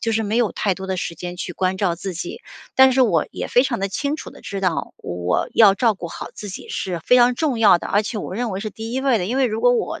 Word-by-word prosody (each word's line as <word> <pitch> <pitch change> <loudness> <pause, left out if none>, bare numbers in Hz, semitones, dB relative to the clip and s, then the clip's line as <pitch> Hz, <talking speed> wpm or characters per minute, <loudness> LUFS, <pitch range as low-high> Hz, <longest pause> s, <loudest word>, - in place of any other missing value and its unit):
就 225 - -1
是 220 0 +1
没 215 +2 -1
有 235 -3 +2
太 195 -3 0
多 190 0 -7
的 190 -1 -2
时 170 -2 -4
间 175 0 -6
去 175 - -5
关 185 +1 -1
照 180 -4 0
自 190 0 -5
己。 180 - -6 0.4
但 265 0 +7
是 265 - +2
我 170 -11 +2
也 - - -5
非 245 +2 +4
常 240 -6 -2
地 195 - -1
清 280 +10 -2
楚 - - -8
地 - - -15
知 195 -1 -5
道， 180 -4 -1
我 90 0 -2
要 205 -4 +7
照 225 -1 +2
顾 175 -2 -7
好 - - -7
自 210 - -8
己 190 - -8
是 175 -3 -3
非 250 - +4
常 245 0 +5
重 270 -3 -1
要 210 -6 +6
的， - - -7
而 205 - +3
且 220 - -4
我 185 - -6
认 240 -2 -2
为 190 - -4
是 215 +1 -4
第 225 +3 -7
1 260 - -1
位 265 -5 +2
的， 180 - -2
因 245 +5 -2
为 265 -2 +3
如 220 0 -3
果 245 +1 +5
我 240 - -2
210 Hz, 320 characters per minute, -21 LUFS, 185-245 Hz, 0.4 s, 但